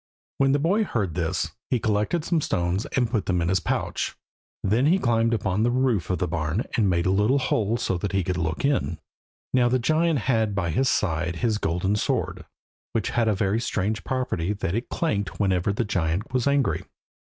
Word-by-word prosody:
When 135 0 +4
the 140 - +3
boy 185 +9 +2
heard 105 - -2
this 85 -2 -1 0.2
he 125 - +2
collected 110 +11 0
some 170 -3 +1
stones 90 -3 -1
and 125 -2 +2
put 110 -5 -1
them 90 -2 +1
in 85 0 0
his 95 +1 +3
pouch. 85 - -2 0.5
Then 115 +8 +2
he 175 +5 +4
climbed 115 -7 +2
up 115 - -1
on 95 0 +1
to 110 - +3
the - - +3
roof 125 -6 +1
of 90 - +1
the 90 - -1
barn 80 +5 -1
and 105 -4 +3
made 85 -1 +1
a 95 - +3
little 105 +8 +3
hole 115 -4 +1
so 95 -6 -1
that 100 - -2
he 95 -1 +1
could 90 +1 -1
look 80 - -1
in. 135 - 0 0.6
Now 125 -1 +4
the 130 - +3
giant 155 +5 +2
had 110 -4 +1
by 90 -4 0
his 130 +11 +2
side 80 -3 0
his 110 +2 0
golden 90 +4 0
sword, 105 - -1 0.5
which 110 - -1
had 120 - +2
the 105 0 +1
strange 110 -2 -1
property 105 -8 -1
that 100 -4 -3
it 115 +4 -2
clanked 100 - -2
whenever 95 -2 +1
the 110 +4 -1
giant 90 +1 -1
was 130 -1 +1
angry. 140 -2 +1
105 Hz, 210 wpm, -25 LUFS, 90-125 Hz, 0.6 s, When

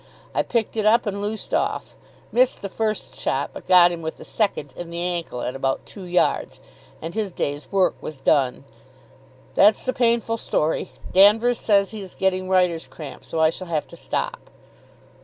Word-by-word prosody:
I - - +2
picked 230 -2 -1
it 215 -2 0
up, 230 +3 +4
and 200 -1 -3
loosed 210 +1 -4
off. - - -1 0.4
Missed 250 -2 +2
the 200 - -3
first 215 +2 -2
shot, - - -1
but - - -10
got 175 -1 +7
him 170 -1 -5
with 160 0 -5
the - - -11
second 175 - -1
in 175 -1 -7
the 170 0 -5
ankle 175 -8 -2
at 125 - -3
about 135 0 -1
two 195 -3 -9
yards; 180 0 0 0.4
and 165 +1 -5
his 210 -3 -2
day's 145 -3 -4
work 195 -2 +3
was 155 - -7
done. 135 -1 +1 0.9
That's 210 +1 +5
the 255 - 0
painful 230 -1 +1
story. 155 -9 -1 0.2
Danvers 220 +5 +5
says 200 -2 +3
he's 200 -4 -8
getting 185 -1 0
writer's 180 -3 +2
cramp, 150 -3 -9
so 165 - -4
I 160 0 +5
shall 185 +2 -8
have 160 -3 -1
to - - -11
stop.... - - -4
185 Hz, 180 wpm, -23 LUFS, 165-215 Hz, 0.9 s, got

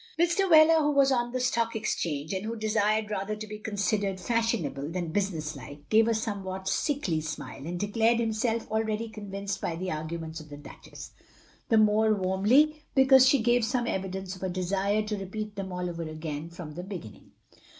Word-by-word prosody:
Mr. 350 +3 +2
Wheler, 320 0 +7
who 295 - +2
was 280 -2 +4
on 240 -2 +1
the 255 - -2
Stock 230 -2 0
Exchange, 160 -7 -2
and 190 +1 -2
who 225 +2 -3
desired 215 -1 +1
rather 205 +1 -2
to 215 0 -7
be 210 0 -8
considered 205 -2 -1
fashion 230 -3 0
able 140 +1 -5
than 170 -1 -3
business 165 -6 -2
like, 145 +2 -11
gave 220 +1 +5
a 230 - +2
somewhat 190 -3 -4
sickly 195 - 0
smile, 145 -2 -6
and 175 +1 -4
declared 225 +3 +2
himself 225 0 -1
already 220 +1 -1
convinced 200 -2 -5
by - - -2
f 165 - -6
he 185 0 -3
arguments 160 +1 -5
of 155 -1 -12
the 145 - -9
Duchess, 145 - -11 0.3
— - - -30
^the 225 - +5
more 215 0 +4
warmly 215 +12 +3
because 265 -1 +7
she 270 -4 +3
gave 240 0 +3
some 240 +2 0
evidence 190 -3 -3
of 185 - -14
a 190 - -2
desire 195 +3 0
to 210 -1 -3
repeat 210 +2 -5
them 195 -1 -5
all 180 0 -3
over 170 -1 -5
again 155 -1 -5
from 170 -3 -9
the 175 - -6
beginning. 180 - -9
205 Hz, 195 wpm, -28 LUFS, 175-225 Hz, 0.3 s, Wheler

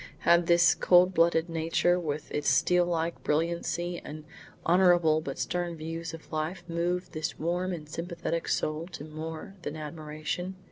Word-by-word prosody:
Had 170 0 +4
this 170 0 +6
cold 180 +1 +5
blooded 165 0 +3
nature, 165 +2 +1
with 150 -3 -4
its 150 - 0
steel 175 +7 +3
like 170 -1 -1
brilliancy 170 +2 -1
and 155 +1 -8 0.4
honourable 175 -3 +4
but 140 -3 -5
stern 175 -1 -2
views 165 +1 -5
of 165 -1 -11
life, 160 +4 -2
moved 175 +2 -1
this 155 0 -4
warm 175 +3 -1
and 160 -4 -6
sympathetic 170 +1 -4
soul 155 +2 -1
to 145 - -6
more 155 +3 -7
than 155 -2 -5
admiration? 155 +4 -5
165 Hz, 150 wpm, -29 LUFS, 155-175 Hz, 0.4 s, this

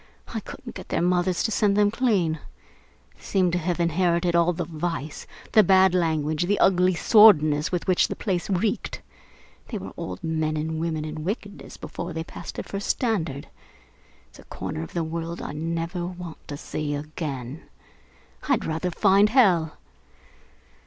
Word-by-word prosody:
I - - -1
couldn't - - -10
get - - -10
their - - 0
mothers 180 0 +1
to 220 - 0
send 205 -1 +2
them 205 -1 +4
clean. 200 -10 +1 0.7
They - - -25
seemed 185 -3 +1
to 175 - 0
have 175 +1 -2
inherited 170 +1 +1
all 170 +1 +4
the 175 0 -3
vice, 160 -2 -4 0.2
the 220 - +7
bad 190 -1 +5
language, 160 -2 +1
the 205 +1 +2
ugly 185 -1 +4
sordidness 160 -8 +6
with 180 -2 -1
which 185 -1 +3
the - - -4
place 185 -4 -2
reeked. 200 +2 -1 0.6
They - - -4
were - - -8
old 90 0 -6
men 155 -1 -1
and 160 +1 -2
women 160 -2 -2
in 155 0 -6
wickedness 205 +2 -5
before 175 - -6
they 160 0 -3
passed - - -9
their - - -4
first 200 0 -5
standard. 170 - -1 0.8
It's - - -18
a - - -13
corner 80 - -5
of 80 - -8
the 170 - -1
world 165 +1 -4
I - - -5
never 165 +3 -3
want 180 -2 -9
to 145 - -6
see 145 0 -3
again. 145 -2 -6 0.8
I'd 260 -5 +2
rather 165 +3 -2
find 200 +3 +4
hell! 185 - +3
170 Hz, 165 wpm, -25 LUFS, 160-190 Hz, 0.8 s, the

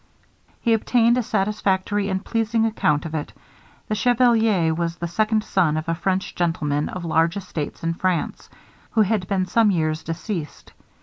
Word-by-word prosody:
He 230 - +2
obtained 235 +1 +3
a - - +2
satisfactory 205 -2 0
and 190 0 -2
pleasing 225 0 +1
account 155 -9 +1
of 160 - -6
it. 150 -2 -4 0.5
The - - -2
chevalier 225 -7 +3
was 170 0 -2
the 170 0 -4
second 215 +4 +1
son 165 -7 +1
of 155 +2 -4
a 165 - +1
French 185 +3 -1
gentleman 150 -4 -1
of 185 -2 -6
large 165 +2 +2
estates 175 -7 -5
in 165 0 0
France, 180 -1 -2 0.4
who 220 - +4
had 205 -3 -1
been 190 -2 0
some 225 +2 +3
years 155 -4 0
deceased. 165 0 -6
185 Hz, 165 wpm, -22 LUFS, 165-215 Hz, 0.5 s, who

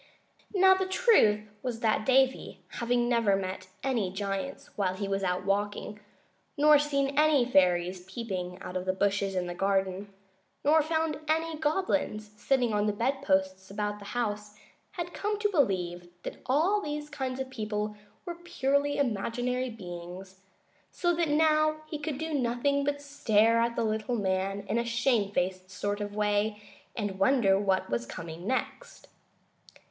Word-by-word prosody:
Now 380 0 +7
the 380 0 0
truth 375 - +4
was 240 -3 -4
that 215 -1 +1
Davy, 265 0 +2
having 240 0 0
never 230 -5 +3
met 185 -1 -4 0.2
any 235 -8 0
giants 195 +6 -4
when 185 -3 0
he 200 +1 -3
was 195 0 -1
out 185 0 -1
walking, 205 +1 -1 0.6
nor 300 0 +7
seen 280 -1 0
any 300 -5 +4
fairies 180 -4 +2
peeping 185 -5 -4
out 180 - -7
of 185 0 -2
the 185 - +1
bushes 195 0 0
in 180 -1 0
the 175 - -4
garden, 195 +1 0 0.5
nor 310 +2 +6
found 315 -1 -1
any 320 +1 0
goblins 295 - -1
sitting 245 +1 +1
on 210 0 +1
the 210 - +1
bedposts 190 -6 0
about 210 +1 -3
the 200 - -11
house, 210 -3 -2 0.4
had 350 -2 -5
come 420 +1 -2
to 420 -1 +2
believe 180 - 0 0.2
that - - -6
all 335 +11 +3
these 295 -4 -4
kinds 265 -3 -4
of 265 0 -4
people 210 -3 -3 0.3
were 345 - -4
purely 285 -4 0
imaginary 250 +1 -1
beings, 185 -2 -9 0.5
so 350 -1 0
that 335 -2 0
now 310 0 +3
he 305 -1 -6
could 295 -2 -3
do 320 +1 -4
nothing 280 +2 +1
but 285 0 -2
stare 230 -5 +3
at 235 0 +1
the - - 0
little 220 +2 -1
man 195 -1 -1
in 205 +4 -1
a - - 0
shamefaced 205 -6 0
sort 205 +2 -3
of 205 0 -5
way 210 0 +1 0.4
and 205 -4 -3
wonder 195 -3 +4
what 195 -2 +1
was 115 0 -1
coming 165 - -7
next. 485 - -3
225 Hz, 155 wpm, -29 LUFS, 195-285 Hz, 0.6 s, Now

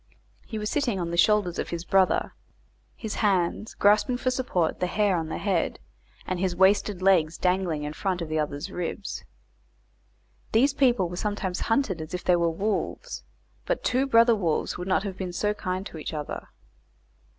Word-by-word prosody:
He 220 - -5
was 210 0 -3
sitting 250 -10 0
on 170 -1 -2
the - - -1
shoulders 200 -1 +3
of - - -3
his 170 0 -4
brother, 190 -1 +2 0.6
his 220 -2 -5
hands 195 +1 +1
grasping 210 +5 +3
for 255 +1 0
support 215 -11 0
the 180 - 0
hair 205 0 +2
on 165 -2 -2
the 160 - -3
head, 190 -5 0 0.5
and 185 -1 -2
his 185 -1 0
wasted 190 0 +3
legs 170 -5 +4
dangling 180 -4 0
in 150 0 -4
front 185 +2 -2
of 165 - -4
the 155 0 -1
other's 145 0 -3
ribs. 180 +3 -4 1.3
These 265 +6 +4
people 245 -9 +3
were 175 +1 -7
sometimes 200 -3 -2
hunted 225 - +1
as 160 +3 -5
if 180 - -5
they 180 - +4
were 170 -1 +2
wolves, 210 - -3 0.4
but - - -1
two 255 +2 +1
brother 230 -2 +6
wolves 170 -7 -1
would 180 - -5
not 190 - +2
have 195 -3 -5
been 185 -2 -4
so 210 +4 0
kind 185 -2 -3
to 160 - -8
each 155 - -5
other. 150 -1 -5
190 Hz, 185 wpm, -26 LUFS, 170-210 Hz, 1.3 s, brother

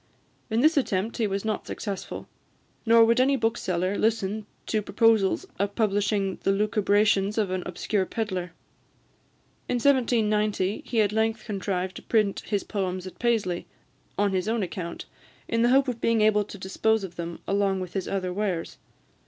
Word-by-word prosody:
In 225 +1 +1
this 310 +2 +4
attempt 215 -4 0
he 225 -3 +1
was 195 +1 -3
not 215 -1 -2
successful; 200 -3 -5 0.6
nor 230 0 +7
would 230 +2 +3
any 270 +2 +4
bookseller 200 -6 0
listen 215 -1 0 0.2
to 215 - 0
proposals 220 - +2
of 200 0 -1
publishing 205 -2 0
the 195 - +2
lucubrations 205 0 +2
of 205 -4 +1
an 185 0 -1
obscure 185 +2 -1
pedlar. 185 -6 -3 1.2
In - - +1
1790, 215 -6 +2
he 230 -3 +2
at 205 -1 +2
length 220 +1 0
contrived 190 -3 -3
to - - -9
print 215 -3 +1
his 205 -2 0
poems 185 -3 -3
at 185 - -10
Paisley, 220 -7 0 0.5
on 205 0 +2
his 185 +1 0
own 225 -1 0
account, 170 -2 -5 0.4
in 230 - 0
the 240 - +4
hope 270 +2 +4
of 240 -2 -3
being 230 -1 +2
able 210 -1 +4
to 205 - -10
dispose 205 +3 0
of 180 -3 -7
them 170 0 -5
along 195 -1 +1
with 185 -2 -6
his 190 -2 -2
other 185 -2 -2
wares. 190 -4 -2
205 Hz, 165 wpm, -26 LUFS, 190-225 Hz, 1.2 s, nor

